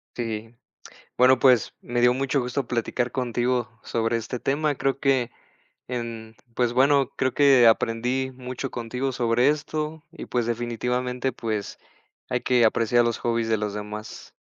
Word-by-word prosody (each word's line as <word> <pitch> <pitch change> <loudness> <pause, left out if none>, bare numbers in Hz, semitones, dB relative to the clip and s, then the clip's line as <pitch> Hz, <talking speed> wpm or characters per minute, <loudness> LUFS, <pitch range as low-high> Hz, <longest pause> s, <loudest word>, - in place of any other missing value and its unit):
Sí. 115 -1 -5 0.6
Bueno, 130 0 +5
pues, 125 -3 +4
me 120 0 -2
dio 125 0 +5
mucho 135 +1 0
gusto 125 +1 -3
platicar 120 +1 -1
contigo 125 -1 -1
sobre 115 0 0
este 115 +2 -5
tema. 145 +3 0
Creo 135 0 -1
que 130 -4 +1 0.6
en 115 -2 -5 0.2
pues, 120 -1 +1
bueno, 135 +2 +3
creo 130 -1 0
que 135 -4 +6
aprendí 120 +4 +1
mucho 130 +1 -6
contigo 125 +3 -3
sobre 120 +1 +2
esto 155 +1 -2
y, 175 - -9
pues, 120 -2 -1
definitivamente, 125 +2 -2
pues, 110 -4 -4 0.5
hay - - 0
que 125 -2 +3
apreciar 115 +2 +3
los 115 -1 -1
hobbies 115 -1 -1
de 110 - +2
los 105 -1 -3
demás. 105 +1 -8
125 Hz, 150 wpm, -25 LUFS, 115-130 Hz, 0.6 s, que